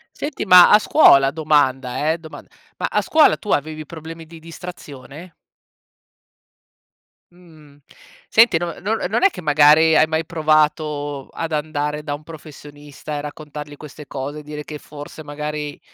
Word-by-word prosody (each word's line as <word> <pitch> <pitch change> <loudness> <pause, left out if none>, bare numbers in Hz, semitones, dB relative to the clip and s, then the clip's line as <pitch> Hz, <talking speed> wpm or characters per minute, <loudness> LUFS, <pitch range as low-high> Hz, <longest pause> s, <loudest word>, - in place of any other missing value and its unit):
Senti 290 -1 -5
ma 180 -2 +8
a 210 - +7
scuola, 140 - +5
domanda, 145 -2 0
eh 165 - -4
domand 160 -2 -12 0.3
ma - - -1
scuola 315 -1 +3
tu 210 - -8
avevi 155 +1 -2
problemi 165 +1 -10
di 165 0 -14
distrazione? 165 -1 -11 2.0
Mhmm, 155 -5 -19 0.5
senti 220 -6 +4
non 170 0 -5
no 210 +4 -1
non 220 - 0
è 395 - +5
che - - -9
magari 150 +1 +4
hai 155 - +5
mai 160 +1 -2
provato 150 -3 -1
ad 165 -1 -5
andare 150 -1 -3
da 150 -1 -5
un 145 +1 -6
professionista 150 -1 -10
e - - -4
raccontargli 150 0 -9
queste 150 0 -12
cose 145 +3 -6
dire 150 0 -8
che, 150 - -8
forse, 145 +1 -11
magari 150 0 -6
150 Hz, 145 wpm, -20 LUFS, 145-165 Hz, 2.0 s, ma